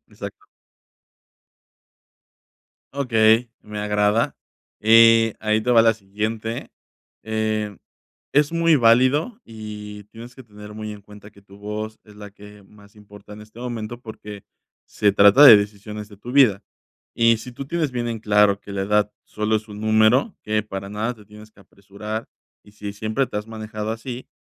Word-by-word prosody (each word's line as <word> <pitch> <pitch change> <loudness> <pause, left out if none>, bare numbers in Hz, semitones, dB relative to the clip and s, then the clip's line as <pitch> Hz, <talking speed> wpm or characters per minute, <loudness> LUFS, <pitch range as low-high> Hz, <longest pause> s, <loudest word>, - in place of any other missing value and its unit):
Exacto. 420 - -10 2.5
Okey, 115 -3 +2
me 105 0 -8
agrada, 105 +2 0 0.4
eh, 115 0 +6
ahí 110 0 +1
te 125 - -2
va 115 -2 +6
la 115 0 +4
siguiente. 110 +2 -5 0.5
Eh, 110 -2 -2 0.6
es 150 +2 +2
muy 165 -1 +3
válido 130 - +3
y 105 -2 -9
tienes 115 +3 -13
que 130 - -12
tener 105 -1 -13
muy 110 0 -6
en 105 -1 -12
cuenta 105 0 -15
que 100 -1 -21
tu 100 0 -17
voz 105 +1 -6
es 105 -1 -17
la 105 -1 -10
que 105 0 -15
más 100 +1 -20
importa 105 0 -15
en 105 +1 -11
este 110 +2 -17
momento, 120 -1 -6
porque 105 -3 -10 0.4
se 105 - +1
trata 100 +8 +7
de 120 -6 +11
decisiones 105 +1 -5
de 105 - -15
tu 120 +5 -9
vida. 115 -8 +4 0.5
Y 115 -1 +3
si 125 - -9
tú 135 +3 -8
tienes 160 -1 -1
bien 120 -1 -3
en 115 -2 -4
claro 105 -2 +3
que 100 - -11
la 95 - -2
edad 105 +1 +1
solo 105 +1 -1
es 110 +1 -7
un 105 0 -9
número, 110 - +2
que 105 0 -1
para 100 -2 -7
nada 110 +4 -2
te 105 -3 -18
tienes 105 +1 -15
que 105 - -22
apresurar 100 +3 -8 0.4
y - - -18
si 105 -1 -7
siempre 110 +6 -2
te - - -7
has 105 - -7
manejado 110 -1 -6
así, 120 +3 -7
110 Hz, 165 wpm, -22 LUFS, 105-115 Hz, 2.5 s, de